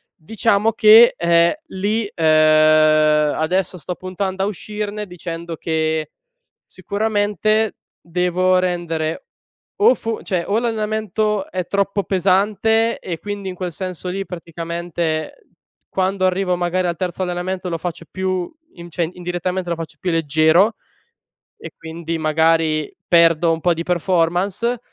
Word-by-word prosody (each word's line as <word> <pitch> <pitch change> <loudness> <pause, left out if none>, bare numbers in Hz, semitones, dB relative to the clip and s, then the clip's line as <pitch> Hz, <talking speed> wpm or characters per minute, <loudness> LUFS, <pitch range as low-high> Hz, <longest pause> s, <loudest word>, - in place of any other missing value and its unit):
diciamo 215 +4 +1
che, 220 +2 +7
ehm, 170 0 +3 0.2
lì, 205 +3 -1
ehm, 155 -1 +4
adesso 180 +3 -1
sto 175 +3 -5
puntando 190 +1 -4
a - - 0
uscirne, 210 +1 -5
dicendo 170 -2 -7
che 160 -1 -1 0.6
sicuramente 210 +2 0 0.2
devo 180 +2 +1
rendere 170 - -2 0.6
o 465 +4 +6
fo 225 -1 -4
cioè 180 -3 -1
o 210 +3 +1
l'allenamento 215 -2 -1
è 185 -2 -3
troppo 200 0 0
pesante, 205 +4 +1
e 170 -3 -5
quindi 205 +1 -5
in 180 - -7
quel 180 -1 -4
senso 185 0 -5
lì, 195 +1 -3
praticamente, 170 - -4 0.4
quando 190 0 0
arrivo 185 0 +1
magari 180 +1 0
al 170 - -1
terzo 185 0 -3
allenamento 180 +1 -3
lo 165 - -2
faccio 170 -1 -5
più 185 -1 -2 0.2
in 170 0 -10
cioè 170 0 -1
indirettamente 180 +1 -3
lo 170 - 0
faccio 160 -2 -8
più 180 - -2
leggero, 165 +6 +3 0.8
e - - -9
quindi 165 0 -5
magari 160 0 +1
perdo 170 -1 +4
un 160 - -4
po' 175 -1 +3
di 165 +1 -4
performance 180 +7 0
180 Hz, 130 wpm, -20 LUFS, 165-200 Hz, 0.8 s, che